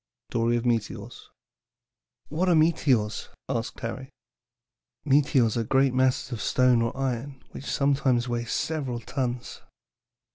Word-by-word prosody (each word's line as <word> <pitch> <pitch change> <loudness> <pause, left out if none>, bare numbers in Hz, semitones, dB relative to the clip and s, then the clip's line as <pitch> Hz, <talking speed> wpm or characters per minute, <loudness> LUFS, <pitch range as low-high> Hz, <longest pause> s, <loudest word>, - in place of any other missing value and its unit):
'" - - -64
STORY 115 0 +1
OF 120 - -3
METEORS. 115 -3 -2 1.0
"What 175 +5 0
are 175 - +5
meteors?" 140 -9 +2 0.2
asked 120 -3 -3
Harry. 130 +3 -5 1.0
"Meteors 135 -5 +3
are 115 - +1
great 135 +3 +2
masses 130 0 +1
of 115 -3 -4
stone 125 0 +3
or 115 +3 -2
iron 135 +1 -3
which 140 - -9
sometimes 135 -3 +1
weigh 120 -1 -2
several 135 -1 -2
tons. 125 0 -4
125 Hz, 130 wpm, -26 LUFS, 120-140 Hz, 1.0 s, are